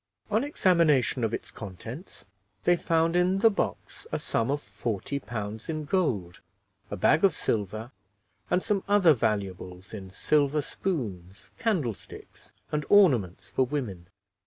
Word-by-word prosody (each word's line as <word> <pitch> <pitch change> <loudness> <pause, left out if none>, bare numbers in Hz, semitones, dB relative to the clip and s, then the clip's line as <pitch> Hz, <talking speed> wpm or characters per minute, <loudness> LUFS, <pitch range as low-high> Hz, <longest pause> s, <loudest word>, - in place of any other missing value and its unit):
On 220 +4 +2
examination 165 - +3
of 110 - +1
its - - -5
contents, 110 - -9 0.4
they 175 - +5
found 165 0 +1
in 180 +2 +3
the 220 +3 +5
box 200 - -4
a - - 0
sum 115 +2 -1
of 145 +1 +1
40 105 +5 -4
pounds 110 -2 -6
in 155 -1 -3
gold, 115 - -1 0.5
a - - -3
bag 155 - +3
of 195 - +5
silver, 110 +3 -2 0.6
and 180 +1 +2
some 210 -4 0
other 200 -6 +6
valuables 100 -5 -3
in 95 -3 -7
silver 145 +8 +1
spoons, 95 - -4
candlesticks, 160 - -3 0.2
and 150 0 0
ornaments 130 - +4
for 130 - +2
women. 120 -11 -4
130 Hz, 135 wpm, -28 LUFS, -, 0.6 s, other